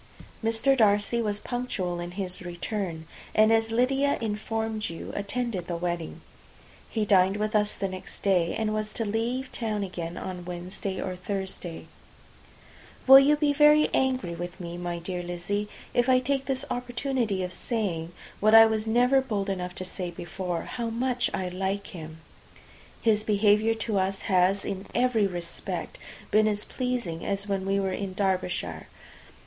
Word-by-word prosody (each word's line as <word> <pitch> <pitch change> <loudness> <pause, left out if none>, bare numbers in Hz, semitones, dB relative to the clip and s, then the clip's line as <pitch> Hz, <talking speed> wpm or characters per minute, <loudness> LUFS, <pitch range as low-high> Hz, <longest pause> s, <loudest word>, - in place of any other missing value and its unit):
Mr. 225 +5 +3
Darcy 210 0 +3
was 205 -2 -1
punctual 205 -9 -3
in 175 0 -4
his 185 -2 -2
return, 175 -1 -4 0.3
and, 215 +1 +6
as 225 0 +2
Lydia 270 +4 +2
imformed 220 0 -2
you, 165 - -7
attended 200 -2 -2
the 175 - -2
wedding. 170 -1 -3 0.7
He 220 -2 -1
dined 195 0 +4
with 215 +1 -1
us 210 0 +2
the 195 - -2
next 185 -1 -8
day, 180 -4 +2
and 215 -1 0
was 215 0 -2
to 225 - -1
leave 235 +5 -2
town 215 -3 -2
again 175 -3 -5
on 180 -1 -5
Wednesday 180 +2 -5
or 185 - -3
Thursday. 190 -2 -4 1.2
Will 270 +1 +11
you 285 +2 +5
be 295 -1 +2
very 300 +1 +6
angry 255 -9 +1
with 175 +1 -6
me, 170 -1 -6
my 175 0 -3
dear 180 +1 -4
Lizzy, 175 +4 -3 0.2
if 245 +1 +2
I 255 - +6
take 270 +1 -1
this 270 0 -1
opportunity 245 -5 -1
of 180 0 -3
saying 175 -7 -2 0.3
(what 215 +2 +5
I 225 0 +11
was 220 0 0
never 245 +4 +4
bold 205 -6 -2
enough 180 -1 -4
to 185 - -4
say 180 -1 -5
before) 175 0 -4
how 235 -2 -4
much 245 +1 0
I 185 - -2
like 190 +2 -2
him? 160 -2 -9 0.8
His 215 -2 +3
behaviour 215 +1 +3
to 220 -2 -1
us 190 +1 -1
has, 190 0 +2
in 195 0 -4
every 240 -4 +3
respect, 175 -2 -4 0.3
been 215 0 +5
as 210 -1 -1
pleasing 245 -10 -3
as 200 +1 -2
when 195 -1 -1
we 195 0 +2
were 190 -1 -1
in 190 -1 -4
Derbyshire. 180 - -1
205 Hz, 165 wpm, -27 LUFS, 180-230 Hz, 1.2 s, Will